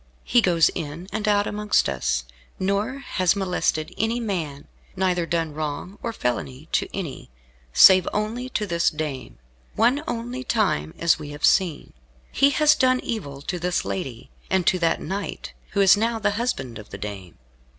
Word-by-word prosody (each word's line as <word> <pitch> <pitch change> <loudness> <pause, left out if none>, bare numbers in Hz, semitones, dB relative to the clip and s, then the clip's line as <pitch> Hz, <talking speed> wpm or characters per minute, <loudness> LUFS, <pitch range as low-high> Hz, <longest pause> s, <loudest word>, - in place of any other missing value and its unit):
He 240 - +4
goes 170 -5 +4
in 165 +2 -6
and 215 0 -2
out 205 -1 +3
amongst 210 0 +1
us, 65 -2 -1 0.3
nor 200 +7 -1
has 185 -1 +1
molested 180 -5 -1
any 225 +2 +1
man, 165 -11 -4 0.3
neither 180 -2 0
done 165 -3 -1
wrong 155 +6 -5
or 235 - -2
felony 130 - -3
to - - 0
any, 170 -9 -6 0.4
save 185 - +7
only 225 +5 -2
to 210 -4 -1
this 170 -3 +2
dame, 140 - -5 0.4
one 245 +6 +3
only 245 +2 -4
time 85 - 0
as 170 -1 +3
we 150 -1 -7
have 145 +1 -1
seen. 180 -6 +2 0.4
He 280 - +4
has 300 +1 +5
done 255 -3 +3
evil 140 -12 -5
to 180 +3 -3
this 180 +1 -1
lady, 130 -11 -5 0.2
and 190 -2 +1
to 185 - +3
that 165 -1 +1
knight, 195 +4 -5 0.2
who 200 - +2
is 195 0 +7
now 225 +2 0
the 210 -2 +1
husband 135 - -3
of 105 - -12
the - - -7
dame. 100 -4 -7
185 Hz, 170 wpm, -24 LUFS, 150-215 Hz, 0.4 s, save